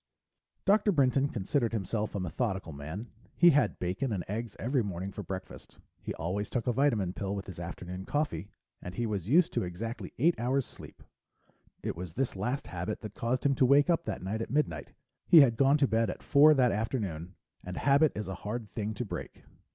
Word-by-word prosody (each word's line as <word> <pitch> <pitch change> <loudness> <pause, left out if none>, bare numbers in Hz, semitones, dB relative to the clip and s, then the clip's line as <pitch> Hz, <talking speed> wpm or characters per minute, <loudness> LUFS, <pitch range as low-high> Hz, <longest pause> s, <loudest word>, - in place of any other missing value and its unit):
Dr. 205 +1 +4
Brinton 140 -3 +3
considered 115 +2 -1
himself 110 +1 -2
a - - -1
methodical 95 0 -2
man. 80 +11 -7 0.3
He 175 0 +7
had 135 -7 +2
bacon 95 +9 -2
and 95 -5 -2
eggs 110 +2 -4
every 130 +2 0
morning 95 -2 -4
for - - -6
breakfast. 95 -1 -8 0.2
He - - -5
always 95 +5 -3
took 120 -3 -2
a 125 - +1
vitamin 115 -9 +1
pill 100 0 -3
with 100 - -5
his 90 -4 -9
afternoon 90 +2 -6
coffee. 100 - -2 0.3
And 90 +1 -7
he 120 - -1
was 100 -3 -3
used 165 +5 +4
to - - 0
exactly 105 +7 -5
eight 165 +7 +4
hours 130 +2 +1
sleep. - - -12 0.8
It - - -2
was 85 -1 -7
this 130 +1 -1
last 125 +8 -2
habit 90 +4 -4
that 110 -2 -7
caused 125 +3 -2
him 140 - +4
to 130 - +3
wake 145 +5 +5
up 170 - +1
that - - -4
night 105 +4 -2
at - - -4
midnight; 105 - -1 0.4
he 165 - +9
had 120 -5 +4
gone 135 +4 +4
to 140 -2 +3
bed 115 -2 +1
at - - -6
four 150 +2 +6
that 125 -3 +4
afternoon 100 -6 -3 0.3
and 90 0 -6
habit 140 +2 +4
is 105 -2 -4
a 95 - -4
hard 110 0 -5
thing 110 -1 -3
to 125 - -3
break. - - -7
110 Hz, 205 wpm, -30 LUFS, 95-135 Hz, 0.8 s, he